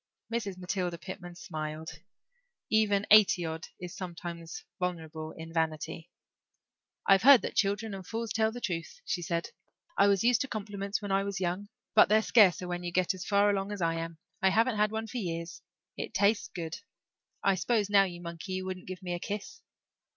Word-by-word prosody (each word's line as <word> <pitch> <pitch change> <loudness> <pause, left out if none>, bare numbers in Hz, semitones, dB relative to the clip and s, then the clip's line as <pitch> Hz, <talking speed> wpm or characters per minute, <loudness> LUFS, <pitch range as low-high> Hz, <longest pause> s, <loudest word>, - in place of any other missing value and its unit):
Mrs. 205 -5 -2
Matilda 180 -1 -2
Pitman 175 0 -8
smiled. 155 -2 -6 0.7
Even 210 -2 +3
eighty 205 -5 +7
odd 160 0 -5
is 180 -1 -7
sometimes 170 -2 -7
vulnerable 160 -3 -4
in 160 0 -8
vanity. 160 0 -2 1.0
"I've 195 0 +6
heard 270 0 +8
that - - -3
children 205 +1 +1
and 190 -1 -6
fools 225 +3 -4
tell 220 0 +2
the 245 - -7
truth," 165 -6 -4
she 180 -1 -1
said. 170 -1 -2 0.4
"I 200 - +5
was 200 0 +3
used 240 -1 +4
to 270 - -1
compliments 205 -2 -4
when 200 - -3
I 195 0 +3
was 200 -1 -3
young 185 +3 -2 0.2
but - - +7
they're 215 +1 +5
scarcer 185 -7 +5
when 175 0 -3
you 175 - -3
get 185 +2 +2
as 185 -1 -7
far 205 0 +4
along 195 0 -1
as 205 - -4
I 165 -2 +1
am. 165 0 -5 0.2
I 190 - +5
haven't 225 +3 +2
had 210 0 +3
one 220 0 -2
for 235 +3 -6
years. 170 -4 -4 0.4
It - - -5
tastes 205 +2 +3
good. 165 -2 -6 0.6
I 195 - +4
s'pose 205 +4 +1
now, 200 -1 +5
you 175 -2 -7
monkey, 170 +2 -6
you 185 0 -3
wouldn't 185 -1 -6
give 185 +1 -7
me 180 -1 -3
a 175 - -3
kiss." 210 - -5
185 Hz, 190 wpm, -30 LUFS, 170-205 Hz, 1.0 s, heard